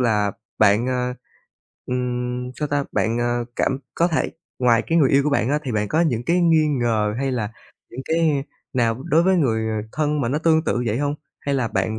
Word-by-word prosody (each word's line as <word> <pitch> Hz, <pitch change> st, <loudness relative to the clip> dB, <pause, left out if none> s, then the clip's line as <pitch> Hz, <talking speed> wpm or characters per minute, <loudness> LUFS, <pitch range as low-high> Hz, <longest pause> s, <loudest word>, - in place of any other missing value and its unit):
là 105 Hz, -4 st, +2 dB, 0.3 s
bạn, 110 Hz, +3 st, +4 dB
ơ, 125 Hz, -1 st, -1 dB, 0.7 s
ừm, 125 Hz, 0 st, -2 dB
sao 150 Hz, -1 st, -2 dB
ta? 145 Hz, -1 st, 0 dB
Bạn, 115 Hz, +2 st, 0 dB
a, 120 Hz, 0 st, 0 dB, 0.2 s
cảm 135 Hz, -, 0 dB, 0.2 s
có 170 Hz, -, +2 dB
thể 160 Hz, -, 0 dB, 0.3 s
ngoài 120 Hz, -2 st, +3 dB
cái 165 Hz, -, +2 dB
người 140 Hz, -5 st, +4 dB
yêu 140 Hz, 0 st, +4 dB
của 150 Hz, -, 0 dB
bạn 135 Hz, -4 st, +1 dB
á 150 Hz, -, +2 dB
thì 130 Hz, -, -3 dB
bạn 105 Hz, -1 st, 0 dB
có 160 Hz, -, +1 dB
những 125 Hz, -9 st, +1 dB
cái 175 Hz, +5 st, +2 dB
nghi 165 Hz, -3 st, +4 dB, 0.2 s
ngờ, 110 Hz, -3 st, +1 dB
hay 135 Hz, -1 st, -1 dB
là 110 Hz, -4 st, -2 dB, 0.4 s
những 125 Hz, -, -7 dB
cái 160 Hz, -3 st, +1 dB, 0.3 s
nào 120 Hz, -1 st, 0 dB
đối 160 Hz, +3 st, +3 dB
với 190 Hz, +1 st, +3 dB
người, 115 Hz, -8 st, +1 dB
ờ, 110 Hz, 0 st, -3 dB
thân 150 Hz, -1 st, 0 dB
mà 120 Hz, -, 0 dB
nó 140 Hz, +5 st, 0 dB
tương 160 Hz, 0 st, +3 dB
tự 120 Hz, -, 0 dB
vậy 110 Hz, +2 st, 0 dB
hông? 145 Hz, 0 st, 0 dB, 0.3 s
Hay 140 Hz, -, -1 dB
là 125 Hz, -4 st, 0 dB
bạn 100 Hz, +3 st, -1 dB
125 Hz, 220 wpm, -22 LUFS, 115-150 Hz, 0.7 s, bạn